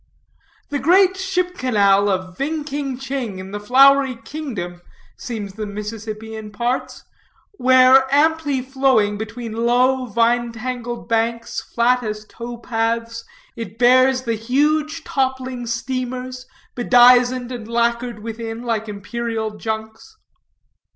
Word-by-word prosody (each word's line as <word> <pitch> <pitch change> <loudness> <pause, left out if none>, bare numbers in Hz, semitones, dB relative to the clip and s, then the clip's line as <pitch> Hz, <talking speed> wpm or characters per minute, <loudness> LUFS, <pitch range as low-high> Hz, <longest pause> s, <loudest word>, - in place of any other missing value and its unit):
The 285 - -2
great 370 +5 +4
ship 365 -1 -2
canal 205 - +3
of 185 -1 -2
Ving 300 +5 -2
King 280 -3 -4
Ching, 265 -6 -4
in 190 +1 -8
the 205 - -4
Flowery 270 +4 +5
Kingdom, 220 - -6 0.3
seems 210 -5 -6
the 215 +1 -5
Mississippi 215 +1 -6
in 215 -1 -7
parts, 240 +4 -3 0.6
where, 260 +1 +6
amply 290 -2 +2
flowing 260 -6 +1
between 230 +1 -6
low, 250 +3 +2
vine 235 +1 +1
tangled 240 0 -5
banks, 230 0 -1
flat 245 +1 +3
as 215 -2 -5
tow 235 +2 -8
paths, 230 0 -2 0.3
it 225 -3 -7
bears 255 +2 +4
the 230 -2 -1
huge 300 +7 0
toppling 260 -3 -2
steamers, 255 +2 -4 0.3
bedizened 245 0 +4
and 235 -3 -6
lacquered 235 -1 -1
within 225 0 -6
like 225 -2 -2
imperial 220 +1 -4
junks. 220 - -6
240 Hz, 120 wpm, -20 LUFS, 220-260 Hz, 0.6 s, where